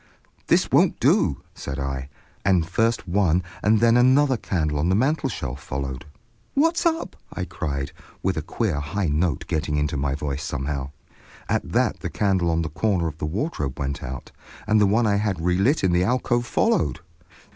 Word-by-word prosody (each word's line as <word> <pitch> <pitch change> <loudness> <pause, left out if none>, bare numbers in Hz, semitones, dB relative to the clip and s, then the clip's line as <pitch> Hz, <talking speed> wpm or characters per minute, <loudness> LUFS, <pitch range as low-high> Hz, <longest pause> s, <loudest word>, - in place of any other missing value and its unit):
"This - - +3
won't - - +4
do!" - - +2
said 70 0 -6
I, 70 -1 -3 0.3
and 95 -4 +3
first 115 +3 0
one 90 -1 +2 0.2
and 105 +1 +4
then 115 +1 +5
another 130 +2 +5
candle 80 -9 -1
on 80 +4 +1
the 95 - +3
mantelshelf 110 - -1
followed. 65 -2 -5 0.5
"What's 330 +4 +3
up?" 330 0 -2 0.2
I 90 - -4
cried, 70 -5 -4 0.3
with 95 -1 +1
a 80 - -1
queer 90 0 -1
high 80 +5 -2
note 80 +3 0
getting 75 -1 -1
into 75 0 0
my 70 0 0
voice 75 0 -3
somehow. 70 -1 -3 0.6
At - - -1
that - - +1
the - - -4
candle 95 -4 +1
on 80 0 +1
the 80 - -3
corner 90 +2 0
of 80 -1 -7
the 75 - -2
wardrobe 75 - -3
went 70 -1 -3
out, 65 -1 -7 0.3
and 105 +1 +3
the 105 - +5
one 110 +4 +3
I 100 -1 +2
had 100 -3 -1
relit 95 - +2
in 95 - +3
the 90 +1 +3
alcove 120 +2 +1
followed. 230 - +1
90 Hz, 180 wpm, -24 LUFS, 75-110 Hz, 0.6 s, then